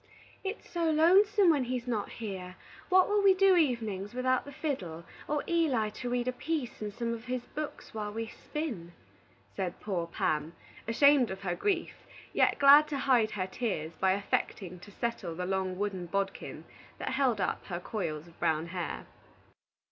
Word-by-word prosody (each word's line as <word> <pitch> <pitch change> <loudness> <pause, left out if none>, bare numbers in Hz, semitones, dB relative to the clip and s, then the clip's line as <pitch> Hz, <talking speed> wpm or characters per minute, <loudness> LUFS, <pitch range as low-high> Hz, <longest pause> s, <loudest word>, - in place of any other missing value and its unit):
"It's 395 +2 -5
so 335 -2 0
lonesome 365 +4 +5
when 280 -5 +1
he's 250 0 -3
not 220 -4 -1
here. 190 -5 -6 0.3
What 370 0 +6
will 415 0 +2
we 390 -1 +6
do 385 0 +5
evenings 230 - 0
without 255 0 +1
the 285 - -9
fiddle, 230 - -4 0.2
or 295 0 0
Eli 275 -11 +2
to 245 +3 -5
read 245 0 -1
a - - +2
piece 280 -2 -3
in 210 -1 -3
some 235 +2 -2
of 230 0 -7
his 250 -1 -3
books 305 0 -6
while 210 -1 -3
we 225 +2 -3
spin?" 225 - -5 0.6
said 180 -2 -3
poor 180 -5 -2
Pam, 155 -1 -1 0.3
ashamed 275 +2 +5
of 190 0 -6
her 180 -3 -1
grief, 370 - -2 0.3
yet - - +3
glad 290 +2 +8
to 290 - -3
hide 250 -5 +3
her 185 - 0
tears 185 -6 -3
by 190 0 +2
affecting 190 -2 -2
to 205 - -13
settle 230 -6 -3
the 180 +2 -3
long 190 -1 -1
wooden 195 -3 -2
bodkin 195 +2 -3 0.3
that - - -3
held 260 -5 +1
up 185 - -1
her 175 -2 -3
coils 165 -6 -4
of 170 -1 -19
brown 160 +1 0
hair. 175 -1 -4
230 Hz, 175 wpm, -30 LUFS, 190-285 Hz, 0.6 s, glad